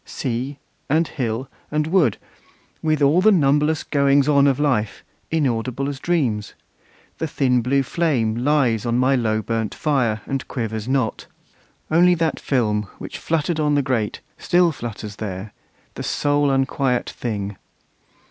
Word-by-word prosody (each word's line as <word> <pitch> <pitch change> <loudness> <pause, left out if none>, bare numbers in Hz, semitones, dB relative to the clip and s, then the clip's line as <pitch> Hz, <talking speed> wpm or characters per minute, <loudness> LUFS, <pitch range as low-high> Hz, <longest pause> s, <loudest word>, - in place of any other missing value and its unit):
Sea, 130 +2 -4 0.3
and 160 +3 +2
hill, 125 -2 -3 0.2
and 150 0 0
wood, 160 - +2 0.6
With 155 -2 +1
all 150 +6 +4
the 215 +3 +6
numberless 150 -2 +2
goings 140 -1 +3
on 140 -1 +5
of 135 -1 +2
life, 120 -8 0 0.3
Inaudible 130 -3 -1
as 140 -2 -4
dreams! 130 -13 -1 0.6
the 160 - -1
thin 130 -4 +1
blue 135 +3 +1
flame 130 -8 0
Lies 125 -3 +2
on 120 0 0
my 130 +2 +3
low 110 -3 0
burnt 115 -1 -2
fire, 125 -8 0
and 135 -1 -3
quivers 110 -3 -4
not; 130 -4 -1 0.6
Only 175 +2 +5
that 165 -2 -1
film, 105 -6 0
which - - -7
fluttered 160 0 -1
on 150 -1 +2
the 145 - +2
grate, 120 -6 -1 0.2
Still 175 -1 +3
flutters 110 -6 -7
there, 100 0 -6 0.4
the - - -7
sole 145 0 +1
unquiet 135 -2 0
thing. 100 -4 -4
135 Hz, 145 wpm, -21 LUFS, 115-150 Hz, 0.6 s, the